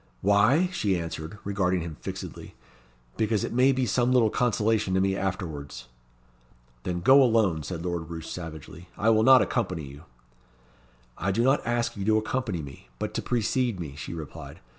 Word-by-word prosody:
"Why?" 105 - +4
she 100 - 0
answered, 80 +2 -6
regarding 95 -3 0
him 80 -2 -6
fixedly. - - -7 0.6
"Because 110 -2 +1
it - - -3
may 130 +3 +4
be 130 -1 0
some 120 +3 +1
little 120 -4 +4
consolation 110 -4 +1
to - - +3
me 95 0 +1
afterwards." 75 - -5 0.9
"Then 90 +5 -3
go 135 +9 +7
alone," 110 -10 +3
said 85 +3 -6
Lord 85 -2 -3
Roos 80 -1 -7
savagely. 80 +1 -8
"I 110 +3 +3
will 110 -1 +4
not 130 +2 +7
accompany 95 -9 -2
you." 70 +3 -12 1.1
"I 95 - -1
do 115 +5 +1
not 135 +3 +3
ask 120 0 0
you 100 - -4
to 110 0 +4
accompany 110 - -2
me, 70 -2 -11
but - - -4
to - - -2
precede 120 -2 0
me," 75 -5 -6
she 75 +1 -7
replied. 80 -3 -9
100 Hz, 170 wpm, -26 LUFS, 85-115 Hz, 1.1 s, go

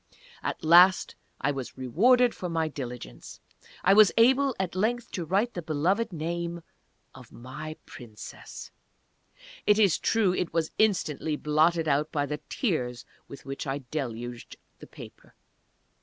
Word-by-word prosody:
At - - -4
last 175 +4 +6 0.3
I 145 - +1
was 135 -3 -6
rewarded 235 - +3
for 180 - -5
my 165 -1 0
diligence. 125 - -8 0.4
I 195 - +5
was 210 0 +7
able 265 +3 +4
at 190 -3 -2
length 230 +5 -1
to 175 - -4
write 200 +8 0
the 175 - -4
beloved 175 +8 0
name 170 +1 -4 0.5
of 125 -3 -14
my 150 +6 -8
Princess! 110 -4 -11 1.0
It 210 - +5
is 200 -6 +3
true 210 -5 +2
it 180 - -2
was 165 -1 -1
instantly 160 -8 +1
blotted 160 +2 +1
out 150 +1 +1
by 145 -2 0
the 150 +1 -5
tears 125 - -2 0.2
with 140 - -12
which 135 +1 -6
I 135 +1 -3
deluged 120 -4 -5 0.2
the - - -12
paper! - - -14
160 Hz, 140 wpm, -27 LUFS, 140-195 Hz, 1.0 s, was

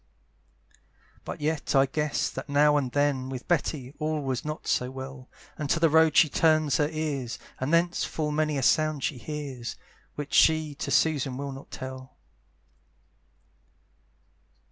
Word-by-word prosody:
But - - -7
yet 155 -1 -1
I 135 0 +6
guess 150 +2 -1
that - - -7
now 145 +1 +4
and 135 -4 0
then 140 -2 +1
With 130 -1 -7
Betty 145 -6 -1
all 155 0 -1
was 130 -2 -2
not 150 +1 -5
so 125 - 0
well, 130 0 -8 0.3
And 150 -2 -3
to 165 - +2
the 165 -2 +3
road 160 -1 +5
she 160 - +7
turns 155 -1 +3
her 150 -1 +1
ears, 150 -6 -3 0.2
And 130 +3 -2
thence 170 +1 +2
full 150 -2 -2
many 155 -1 0
a 135 - -1
sound 155 +1 +2
she 135 - -2
hears, 135 -3 -6 0.4
Which 145 -1 -6
she 155 -2 +4
to 140 - -5
Susan 140 -5 +1
will 140 0 -4
not 135 +1 -10
tell. 130 0 -8
145 Hz, 155 wpm, -27 LUFS, 135-155 Hz, 0.4 s, she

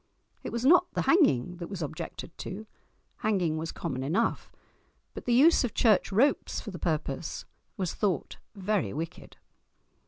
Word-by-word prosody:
It - - -5
was 235 +1 -2
not 355 +4 +5
the - - +1
hanging 180 - +3
that 170 -1 -6
was 190 -4 -4
objected 155 +2 -7
to—hanging 195 -3 -4
was 160 +1 -4
common 135 -7 -4
enough; 175 - 0 0.6
but - - -8
the 245 - 0
use 290 +7 +6
of 245 - -3
church 215 -4 +3
ropes 260 +9 +2
for 210 - -7
the 175 - -8
purpose 155 -2 -2 0.3
was 185 -3 -2
thought 190 -9 -1 0.2
very 195 - -1
wicked! 165 +3 -7
190 Hz, 150 wpm, -29 LUFS, 160-230 Hz, 0.6 s, use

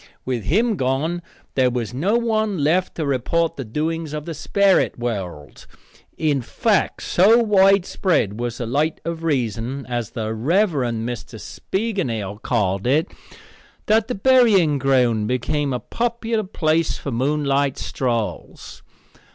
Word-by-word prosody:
With 125 -5 -2
him 220 - +2
gone 140 +7 -1 0.3
there 130 -2 +3
was 120 -2 -3
no 185 - +1
one 220 -7 0
left 175 +5 +1
to 160 - -2
report 145 +5 0
the 135 - -5
doings 155 +6 -3
of 150 -1 -5
the 165 - -5
sperrit 200 +4 +2
world. 95 - -5 0.5
In 145 -4 +1
fact, 205 - 0
so 205 +6 +5
widespread 195 - +2
was 120 -1 -3
the 120 - -3
light 145 +7 0
of 165 -1 -4
reason, 130 -2 -2
as 120 -3 -3
the 110 -1 -4
Rev. 170 - +2
Mr. 120 -4 -3
Spiegelnail 120 - -3
called 100 -3 0
it, 155 +7 +2 0.7
that 220 0 +3
the 250 - -3
burying 200 - +4
ground 125 -5 +2
became 135 +4 -1
a 125 - -1
popular 230 - -2
place 160 -3 0
for 140 - -5
moonlight 140 +2 0
strolls. 120 -5 -4
145 Hz, 135 wpm, -21 LUFS, 120-190 Hz, 0.7 s, so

